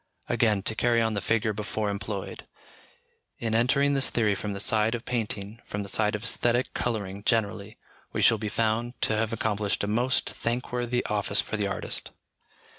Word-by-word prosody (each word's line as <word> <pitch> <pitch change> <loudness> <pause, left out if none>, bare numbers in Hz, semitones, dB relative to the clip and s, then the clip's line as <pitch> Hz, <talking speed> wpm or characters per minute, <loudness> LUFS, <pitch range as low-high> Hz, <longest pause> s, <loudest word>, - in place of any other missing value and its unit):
Again, 105 -4 +2
to 110 - 0
carry 120 +1 +2
on 110 -1 +1
the 100 - -1
figure 110 +2 +1
before 105 +1 -3
employed, 100 -1 -5 0.9
in 115 -1 -2
entering 140 +5 +3
this 135 -1 +4
theory 110 -3 +2
from 100 +1 -3
the 100 - -5
side 110 +2 +3
of 120 - -7
painting, 110 -2 -3
from 105 0 -4
the 100 - -7
side 105 +1 +2
of 105 - -5
æsthetic 120 +1 +1
colouring 100 -4 -3
generally, 110 -1 0 0.3
we - - 0
shall 115 -2 +6
be 105 -1 -3
found 115 +3 -1
to 110 - +2
have 110 0 0
accomplished 105 -3 0
a - - 0
most 120 +5 +1
thank 120 +2 -3
worthy 125 0 -1
office 105 -1 0
for - - -1
the 105 -2 0
artist. 95 - -3
110 Hz, 185 wpm, -27 LUFS, 105-115 Hz, 0.9 s, shall